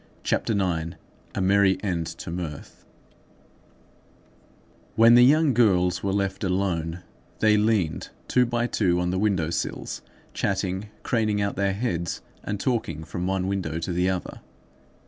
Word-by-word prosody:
CHAPTER 115 - 0
IX—A 90 -3 -3
MERRY 95 0 +4
END 85 -5 -1
TO 85 0 -7
MIRTH 85 -4 -7 2.1
When 115 +1 +7
the 120 0 +8
young 150 +2 +5
girls 95 -6 +3
were 100 - -1
left 100 0 -1
alone, 90 -3 -1 0.3
they 110 -1 +4
leaned 105 -6 +1 0.2
two 125 -1 +3
by 120 0 0
two 90 -7 +1
on 90 0 0
the 95 - -1
window 95 -6 +1
sills, - - -3 0.3
chatting, 95 +1 -2
craning 110 -3 +1
out 100 0 -1
their 100 0 +1
heads, 90 -6 -2 0.2
and 105 -1 -3
talking 100 - -1
from 90 +2 -4
one 95 -1 0
window 95 -5 -2
to 85 +2 -3
the 90 +2 +1
other. 95 -1 -4
95 Hz, 140 wpm, -25 LUFS, 90-105 Hz, 2.1 s, the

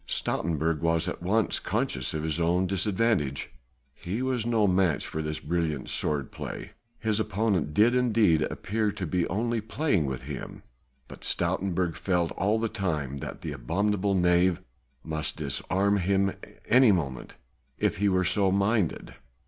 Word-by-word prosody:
Stoutenburg 80 -1 -1
was 85 0 +1
at - - -4
once 100 +2 +1
conscious 65 +2 -2
of 75 - -2
his 80 0 -1
own 85 +2 +2
disadvantage. 95 - 0 0.4
He 95 - -4
was 125 -3 -1
no 115 -3 +3
match 90 -4 +2
for 80 - -4
this 75 0 -3
brilliant 80 -4 -2
sword 70 -3 -1
play; - - -7 0.3
his 110 -1 0
opponent 100 -6 0
did 115 +4 +5
indeed 115 -10 +3
appear 105 +6 -1
to 100 -3 -4
be 85 +2 0
only 115 +4 -1
playing 105 - 0
with 65 -1 -4
him, - - -7 0.4
but - - -12
Stoutenburg 90 -3 0
felt 90 -3 0
all 105 +4 +1
the 115 +1 0
time 80 -11 -2
that - - -7
the 80 - -4
abominable 100 +9 0
knave 90 0 +3 0.4
might 80 -1 -2
disarm 95 +7 0
him 95 +1 +2
at - - -12
any 125 -2 +6
moment 70 -9 -2 0.4
if - - 0
he 100 +2 +2
were 95 -1 +2
so 95 +1 +2
minded. 100 -1 0
95 Hz, 155 wpm, -27 LUFS, 80-105 Hz, 0.4 s, any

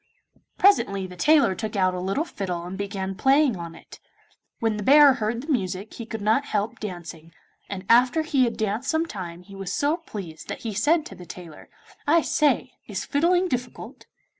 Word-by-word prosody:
Presently 200 - +3
the 180 -1 -9
tailor 295 - +4
took 215 +2 -5
out 185 -2 +2
a 180 - -3
little 195 - -1
fiddle 180 - -4
and 180 +2 -6
began 195 -1 -4
playing 270 +4 +3
on 170 -2 -7
it. - - -14 0.6
When 225 -2 0
the - - -4
bear 285 +3 +8
heard 230 -1 -2
the 310 - -4
music 195 -4 -2
he 230 - -8
could 220 -3 -5
not 220 +6 +3
help 215 +1 -2
dancing, 170 -5 -8 0.4
and 190 -1 -6
after 250 +7 +4
he 280 -5 +2
had 235 - -3
danced 220 +4 -2
some 320 +1 +1
time 180 - -7
he 200 - -14
was 195 -1 -5
so 295 +3 +1
pleased 195 - -9
that - - -6
he 225 -2 -4
said 300 - +2
to - - -9
the 180 - -12
tailor, 170 -3 -11 0.4
'I 325 +2 +4
say, 300 -1 +1 0.2
is - - -4
fiddling 350 +5 +2
difficult? 250 -5 -5
215 Hz, 190 wpm, -25 LUFS, 190-285 Hz, 0.6 s, bear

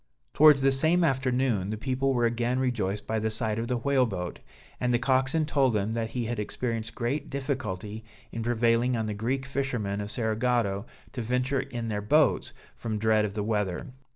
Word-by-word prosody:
Towards 150 -3 +6
the 135 - +5
same 160 +6 +3
afternoon, 130 - +1
the 110 - -3
people 130 +3 0
were 120 -1 +2
again 120 +2 0
rejoiced 105 -6 -1
by 110 0 -1
the 110 +1 0
sight 110 0 -1
of 115 - -2
the 125 0 0
whale 130 0 +2
boat, 90 -4 -5 0.4
and 125 0 +1
the 120 - +4
coxswain 135 +5 +1
told 140 -4 +2
them 105 +1 0
that 115 -1 -2
he 120 -1 -3
had 115 -1 -3
experienced 115 +1 -3
great 125 +5 -2
difficulty 110 -7 -4 0.3
in 115 - -4
prevailing 120 +1 +2
on 110 - -1
the 105 - -2
Greek 125 +6 -2
fishermen 125 -8 -2
of 105 - -4
Cerigotto 110 -2 0 0.3
to 125 - -3
venture 125 +4 0
in 120 -3 -4
their 105 -1 -2
boats, 145 +6 +2 0.2
from 110 -2 -3
dread 110 0 +3
of 100 -1 -5
the 105 - -1
weather. 105 +2 -2
120 Hz, 190 wpm, -28 LUFS, 110-130 Hz, 0.4 s, Towards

